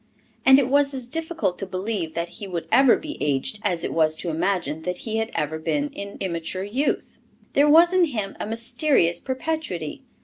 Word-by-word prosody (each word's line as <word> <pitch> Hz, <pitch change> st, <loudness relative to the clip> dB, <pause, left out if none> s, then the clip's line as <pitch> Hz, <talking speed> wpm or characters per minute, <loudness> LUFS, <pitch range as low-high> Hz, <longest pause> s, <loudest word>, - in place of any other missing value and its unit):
And 265 Hz, 0 st, +9 dB
it 275 Hz, -3 st, +2 dB
was 280 Hz, +1 st, +3 dB
as 255 Hz, -2 st, -2 dB
difficult 320 Hz, -, -2 dB
to 195 Hz, -, -3 dB
believe 185 Hz, -3 st, -3 dB
that 170 Hz, +1 st, -1 dB
he 200 Hz, -, -8 dB
would 175 Hz, -3 st, -4 dB
ever 265 Hz, -2 st, +6 dB
be 305 Hz, -1 st, -7 dB
aged 145 Hz, +8 st, -1 dB
as 180 Hz, -6 st, -1 dB
it -, -, -2 dB
was 155 Hz, -1 st, +3 dB
to 170 Hz, +1 st, -3 dB
imagine 165 Hz, -2 st, -1 dB
that 180 Hz, +2 st, -3 dB
he 220 Hz, -1 st, -2 dB
had 225 Hz, 0 st, -1 dB
ever 160 Hz, 0 st, -2 dB
been 285 Hz, -, -1 dB
in 200 Hz, -7 st, -7 dB
immature 180 Hz, 0 st, -3 dB
youth. 250 Hz, +9 st, -2 dB, 0.3 s
There 290 Hz, +2 st, +4 dB
was 335 Hz, +4 st, +6 dB
in 370 Hz, -1 st, +5 dB
him 215 Hz, -10 st, -4 dB
a -, -, -3 dB
mysterious 225 Hz, -, +2 dB
perpetuity. 260 Hz, -, -4 dB
205 Hz, 195 wpm, -24 LUFS, 170-280 Hz, 0.3 s, And